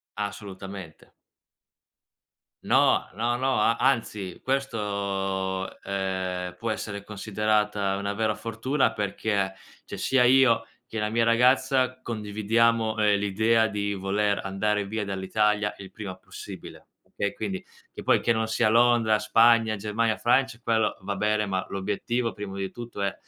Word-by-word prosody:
Assolutamente. 100 -4 -7 1.5
No, - - +3
no, 120 +2 0
no, 130 +1 0
a 115 +2 +3
anzi, 105 -9 -1
questo, 100 -7 -2
ehm, 95 -2 -3
può 115 +3 -3
essere 100 -1 -5
considerata 105 -1 0
una 100 0 -2
vera 110 0 0
fortuna 125 +5 0
perché, 100 -1 -1 0.3
cioè, - - -8
sia 130 -2 +3
io 130 -2 +5 0.2
che 110 - -7
la 105 0 0
mia 115 +1 +2
ragazza 130 +2 +3
condividiamo, 110 +1 +1
ehm, 105 -1 +3
l'idea 110 +3 +2
di 100 -1 -2
voler 100 +1 0
andare 100 +1 0
via 110 +1 -3
dall'Italia 105 +2 0
il 95 -1 -10
prima 100 -3 -7
possibile. 95 - -11 0.3
Okay, 100 - -1
quindi 100 -4 -4 0.3
che - - -8
poi - - +3
che 115 - +2
non 110 -1 +1
sia 110 0 +2
Londra, 115 -2 +4
Spagna, 115 0 +4
Germania, 110 +2 0
Francia, 120 -1 +2
quello 110 -2 +1
va 100 0 -4
bene, 105 +1 +1
ma 95 -1 -2
l'obiettivo 105 +4 -2
prima 100 0 -7
di 95 -1 -3
tutto 120 -4 -7
è 100 - 0
105 Hz, 135 wpm, -26 LUFS, 100-115 Hz, 1.5 s, io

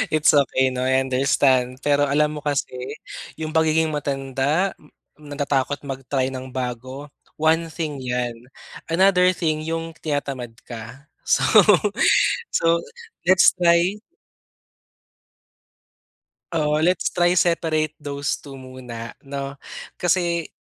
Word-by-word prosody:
It's 155 - +5
okay, 130 -2 +3
'no? 130 0 -2
I 130 0 +3
understand. 130 -1 +1
Pero 145 0 +2
alam 150 +2 +1
mo - - -14
kasi 145 -3 -1 0.6
yung 155 0 -5
pagiging 160 0 +2
matanda, 140 +4 -1 0.5
natatakot 145 -1 -2
mag-try 135 -1 -2
ng 130 0 -6
bago, 130 +3 -5 0.2
one 160 +1 +2
thing 155 -4 -5
yan, 125 -2 -2 0.5
another 180 +1 +4
thing 155 -3 -1
yung 165 0 -3
tinatamad 135 -6 -4
ka. 120 +4 -10 0.2
So, - - +3 1.1
so, - - +1 0.6
let's 185 0 +6
try 175 +3 +3 2.6
oo, 150 -1 +1
let's 180 +3 +1
try 175 -1 +3
separate 160 -3 +1
those 145 0 -3
2 140 -2 -10
muna, 125 -3 -9
no? 140 0 -5 0.5
Kasi, 170 -1 +1
145 Hz, 110 wpm, -22 LUFS, 130-160 Hz, 2.6 s, let's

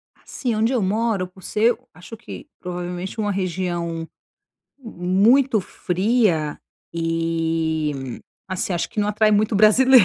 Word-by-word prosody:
Assim, 240 -4 -4
onde 225 +4 +1
eu 240 - +1
moro, 205 -1 0
por 185 +1 -18
ser, 225 +3 +2 0.2
acho 175 +7 -11
que 240 - -10
provavelmente, 180 +3 -5
uma 205 -1 0
região 175 -3 -2 0.7
muito 225 +3 +3
fria 185 -5 0 0.3
e, 165 -4 -1 0.3
assim, 185 0 -2
acho 175 - -1
que 215 - -3
não 205 - +1
atrai 215 +1 +3
muito 215 +1 +2
brasileiro, 240 +2 +7
190 Hz, 125 wpm, -22 LUFS, 170-220 Hz, 0.7 s, brasileiro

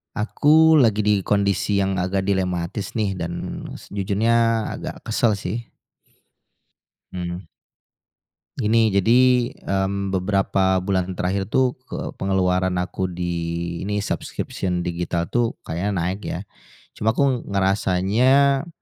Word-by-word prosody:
Aku 155 +8 +4
lagi 110 -7 +4
di 105 - +5
kondisi 100 0 +1
yang 95 0 +1
agak 95 +1 -1
dilematis 95 +1 -2
nih 100 -3 0
dan 85 -1 -5 0.2
sejujurnya 110 +3 +1
agak - - -7
kesel 110 -2 +1
sih. 110 +5 -5 1.4
Hmm. 90 -1 -4 1.2
Gini, 110 -1 +3
jadi, 120 +5 +3
mmm, 100 0 -1
beberapa 95 0 +1
bulan 95 -1 -1
terakhir 95 +2 -1
itu 125 +4 +1
ke - - -5
pengeluaran 95 -1 +1
aku 95 +1 -3
di 85 -1 -3
ini 105 0 -1
subscription 90 -3 -3
digital 85 0 -2
itu 120 -1 +1
kayaknya 90 +6 -2
naik 90 +3 -2
ya. 90 - -3 0.6
Cuma 110 +2 +1
aku 135 -3 +1
ngerasanya, 105 - +2
100 Hz, 110 wpm, -22 LUFS, 90-110 Hz, 1.4 s, di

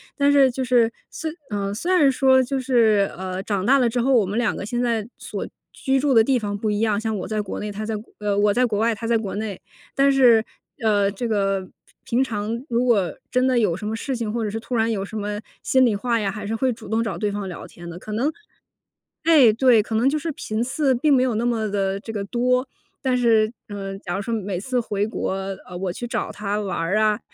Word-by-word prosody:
但 285 -1 +3
是 275 -2 +5
就 260 +2 -3
是 240 -2 +3 0.2
虽 320 -1 -5 0.2
呃， 200 -2 -2
虽 335 - -2
然 300 -7 +5
说 260 0 +4
就 270 +2 -2
是， 225 -6 +3
呃， 185 0 -4
长 200 -1 -2
大 275 +4 +5
了 245 -2 +3
之 245 - -1
后， 265 +3 +2
我 220 -6 +4
们 205 +4 -3
两 240 -3 +1
个 - - -5
现 240 +4 -3
在 230 -3 0
所 - - -5 0.3
居 270 -1 0
住 285 -1 +2
的 225 - +7
地 260 +3 +2
方 205 -3 -3
不 215 +1 -2
一 205 0 0
样， 215 -2 +2
像 220 -1 -2
我 - - -4
在 215 -1 -1
国 205 - -6
内， 210 0 -4
她 210 +2 -5
在 220 0 -2
国 210 +2 -9
呃， 205 -1 -1
我 205 0 +3
在 250 +4 +3
国 220 -4 -1
外， 225 +2 +2
她 225 +1 -5
在 230 0 +3
国 215 -3 -4
内。 210 -2 -4 0.4
但 275 +1 +4
是， 245 -5 +5 0.4
呃， 205 -2 +3
这 205 +4 -5
个 195 -2 +1 0.4
平 235 - -2
平 - - +5
常， 225 -1 -3
如 240 -3 +1
果 210 -8 +2 0.2
真 255 +1 +2
的 255 -1 +2
有 205 -8 +2
什 210 - -5
么 220 - -2
事 265 +4 -3
情， 230 -4 -3
或 230 +1 -2
者 215 - -1
是 220 +2 -4
突 245 +2 -5
然 225 0 +2
有 195 -3 -2
什 215 - -10
么 205 0 -3 0.2
心 260 -1 +4
里 225 -4 +2
话 230 +3 0
呀， 205 -2 -1
还 205 +1 -6
是 215 - -3
会 255 +2 +1
主 225 -3 -12
动 220 +1 +1
找 225 - -3
对 210 -2 -1
方 200 -1 -4
聊 180 - -7
天 175 0 -11
的。 170 - -8
可 215 - -9
能 235 +8 +1 0.9
哎， 295 -9 +6
对， 235 0 +5
可 220 - -5
能 240 +5 +3
就 305 - 0
是 325 +1 -3
频 215 -5 -4
次 265 +2 +1
并 285 +4 +3
没 255 - +4
有 250 -4 +1
那 235 +2 0
么 225 -3 0
地 195 -1 -1
这 225 - -7
个 205 -2 -3
多。 250 +4 +1 0.3
但 260 -2 +1
是， 225 -3 +3 0.2
呃， 195 -1 -5
假 175 -1 -4
如 - - -2
说 230 +3 -2
每 200 -4 -3
次 250 +6 -1
回 205 -3 -1
国， 220 - -3 0.4
呃， 180 -1 -7
我 185 -1 -2
去 240 +6 -6
找 - - -2
她 205 0 -2
玩 200 -2 -3
儿 165 +5 0
啊、 215 0 +2
220 Hz, 275 characters per minute, -23 LUFS, 205-250 Hz, 0.9 s, 的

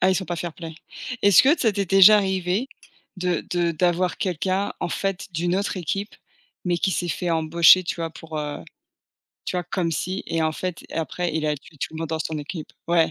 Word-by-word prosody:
Ah, 190 - +4
ils - - +2
sont 190 - -1
pas 175 - -4
fair-play. 165 -1 -6 0.5
Est-ce 200 -3 +7
que 290 +6 +4
ça 225 -4 +2
t'est 200 0 -1
déjà 195 +2 +8
arrivé 190 +3 0 0.5
de 180 -2 -1
de 175 -1 +1
d'avoir 175 +2 +1
quelqu'un, 190 0 -1
en - - -1
fait, 195 +1 -3
d'une 175 +3 0
autre 200 0 -2
équipe, 195 +4 -3 0.5
mais 175 -1 +1
qui 190 - +1
s'est 175 -1 -1
fait 175 +1 -2
embaucher, 165 +2 +5
tu 175 - -3
vois, 165 -1 -3
pour 160 -1 -8
heu, 150 -1 -4 0.9
tu - - -3
vois, 180 - -2
comme 175 0 -1
si 185 +4 -3
et 165 -1 -1
en 155 0 +1
fait, 180 +1 -5
et - - -9
après 165 +1 -2
il 160 - -1
a 150 -1 0
tué 150 +3 -16
tout - - -4
le - - -6
monde 165 -1 -3
dans 160 0 -2
son 160 -1 -3
équipe? 150 +2 -7
Ouais. 170 -1 +3
175 Hz, 220 wpm, -23 LUFS, 165-190 Hz, 0.9 s, déjà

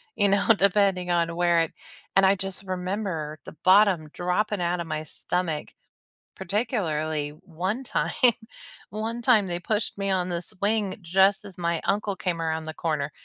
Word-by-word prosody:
you 205 - +3
know, 200 0 +2
depending 195 -2 +2
on 170 -1 +1
where 175 -1 +3
it 165 - -1 0.4
and 195 - +6
I 195 +1 +5
just 195 0 -5
remember 180 -5 -3
the - - -10
bottom 185 -5 +5
dropping 180 +3 -1
outta 175 0 0
my 155 -1 -3
stomach, 160 -1 -3 0.7
particularly 170 - -1
one 185 +9 -3
time. - - -1 0.8
One 220 +3 -4
time, 225 -5 +4
they 175 -1 -3
pushed 210 +2 -2
me 195 0 -1
on 185 -1 0
the 170 -1 -2
swing 205 +1 -1
just 190 +4 +3
as 195 -3 -11
my 170 -2 -1
uncle 205 -1 0
came 175 -3 -2
around 160 -1 -2
the 160 - -5
corner. 155 -3 -2
185 Hz, 160 wpm, -26 LUFS, 165-200 Hz, 0.8 s, and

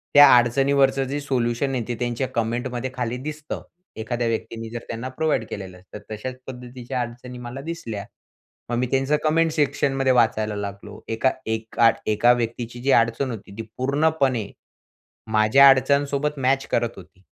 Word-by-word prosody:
त्या 145 0 +10
अडचणीवरचं 135 +3 +3
जे 140 +2 -2
सोल्युशन 130 -1 0
आहे 120 - -1
ते 120 - -2
त्यांच्या 120 +2 -1
कमेंटमध्ये 120 +2 -2
खाली 125 -1 -2
दिसतं. 150 +3 -6 0.3
एखाद्या 120 +2 -2
व्यक्तीने 115 0 -3
जर 120 +1 -5
त्यांना 115 +3 -4
प्रोव्हाईड 130 -3 0
केलेलं 95 -3 -7
असतं 95 +3 -11
तर 105 - -10
तशाच 125 +4 -6
पद्धतीच्या 125 0 -5
अडचणी 120 +1 -7
मला 125 +2 -7
दिसल्या. 130 -10 -5 0.6
मग 120 - -1
मी 125 +1 0
त्यांचं 135 +3 +2
कमेंट 160 +1 +3
सेक्शन 145 -2 +1
मध्ये 135 -1 +2
वाचायला 110 -3 +2
लागलो. 100 +1 -7
एका 115 +4 +1
एका 110 +1 +2 0.2
एका 120 +4 +5
व्यक्तीची 120 0 -4
जी 135 +2 +1
अडचण 115 +3 0
होती 110 -4 -8
ती - - -3 0.2
पूर्णपणे 135 -4 +1 0.8
माझ्या 110 +6 +7
अडचणीसोबत 140 +2 +2
मॅच 135 +1 +1
करत 115 0 0
होती. 95 0 -15
125 Hz, 155 wpm, -23 LUFS, 115-135 Hz, 0.8 s, त्या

